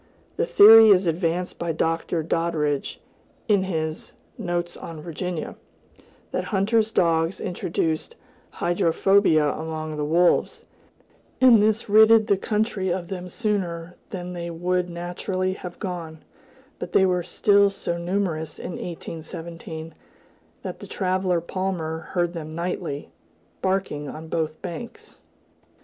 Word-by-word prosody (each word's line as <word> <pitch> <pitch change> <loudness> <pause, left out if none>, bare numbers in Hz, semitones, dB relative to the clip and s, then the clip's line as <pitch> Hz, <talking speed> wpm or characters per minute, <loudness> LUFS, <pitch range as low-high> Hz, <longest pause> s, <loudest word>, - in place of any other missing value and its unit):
The - - 0
theory 225 - +9
is 195 -2 +5
advanced 170 +1 -1
by 170 -1 -1
Dr. 165 +1 -1
Doddridge, 155 -3 -1 0.5
in 200 -3 +3
his 160 -4 -3 0.2
Notes 175 -4 -3
on 165 -2 -8
Virginia, 170 +2 -5 0.8
that - - -2
hunters' 215 +2 +1
dogs 165 -2 +1
introduced 170 - -2 0.3
hydrophobia 175 -2 +3
among 155 -1 -5
the 150 - -1
wolves, 170 +4 +2 0.7
and 245 -5 +7
this 215 +1 +1
ridded 220 +1 +6
the 200 - +3
country 210 -1 -1
of 175 -1 -3
them 180 -2 -5
sooner 180 -5 -2
than 180 -2 -6
they 170 -1 -5
would 180 +2 -1
naturally 180 +2 -3
have 180 -2 -8
gone; 170 -5 -6 0.6
but 175 - -6
they 190 - +5
were 180 -1 +1
still 200 +3 +3
so 195 -3 -3
numerous 170 -4 -2
in - - -6
1817, 165 -1 -7 0.7
that - - -6
the - - -9
traveler 185 -2 0
Palmer 170 -2 -3
heard 175 +2 -2
them 160 -3 -6
nightly, 165 -3 -4 0.5
"barking 185 -7 -1
on 160 +1 -9
both 160 -1 -2
banks." 195 +6 -8
175 Hz, 125 wpm, -24 LUFS, 165-195 Hz, 0.8 s, theory